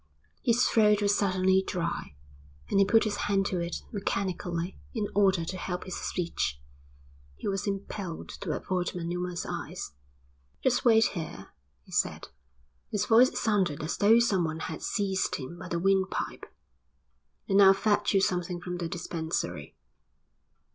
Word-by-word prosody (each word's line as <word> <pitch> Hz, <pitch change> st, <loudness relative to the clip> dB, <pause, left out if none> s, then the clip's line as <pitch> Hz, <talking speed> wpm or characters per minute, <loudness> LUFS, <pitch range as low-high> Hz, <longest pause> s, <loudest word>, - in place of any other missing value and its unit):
His 235 Hz, +1 st, +3 dB
throat 210 Hz, -2 st, +4 dB
was 205 Hz, 0 st, +3 dB
suddenly 190 Hz, -1 st, +3 dB
dry, 170 Hz, -, -3 dB, 0.6 s
and 195 Hz, -, +3 dB
he 195 Hz, -, +6 dB
put 225 Hz, +3 st, +4 dB
his 215 Hz, -3 st, -1 dB
hand 195 Hz, -1 st, +2 dB
to 185 Hz, -2 st, -1 dB
it 170 Hz, 0 st, -4 dB
mechanically 185 Hz, -3 st, -2 dB, 0.2 s
in 215 Hz, -3 st, 0 dB
order 190 Hz, -4 st, +3 dB
to 185 Hz, -, -4 dB
help 180 Hz, -1 st, -4 dB
his 185 Hz, -, -6 dB
speech. 165 Hz, -, -2 dB, 0.8 s
He -, -, -6 dB
was 200 Hz, +1 st, -1 dB
impelled 195 Hz, -3 st, -4 dB
to -, -, -4 dB
avoid 180 Hz, -2 st, -2 dB
Manuma's 175 Hz, +1 st, -3 dB
eyes. -, -, -5 dB, 0.7 s
"Just 255 Hz, -2 st, +2 dB
wait 225 Hz, -2 st, +6 dB
here," 155 Hz, -, -6 dB, 0.3 s
he -, -, -19 dB
said, -, -, -1 dB, 0.6 s
his 205 Hz, -1 st, 0 dB
voice 245 Hz, +2 st, +5 dB
sounded 195 Hz, -, +1 dB
as 155 Hz, -, -2 dB
though 215 Hz, +3 st, +6 dB
someone 175 Hz, -9 st, +1 dB
had 160 Hz, -, -5 dB
seized 195 Hz, -2 st, 0 dB
him 155 Hz, +5 st, -7 dB
by -, -, -7 dB
the 170 Hz, -, -2 dB
windpipe, 190 Hz, +2 st, 0 dB, 1.0 s
"and 195 Hz, 0 st, +5 dB
I'll 195 Hz, -1 st, +9 dB
fetch 205 Hz, 0 st, +1 dB
you 195 Hz, -, +5 dB
something 180 Hz, -1 st, 0 dB
from 180 Hz, 0 st, -5 dB
the 170 Hz, -1 st, -3 dB
dispensary." 160 Hz, -, -4 dB
190 Hz, 150 wpm, -29 LUFS, 170-205 Hz, 1.0 s, I'll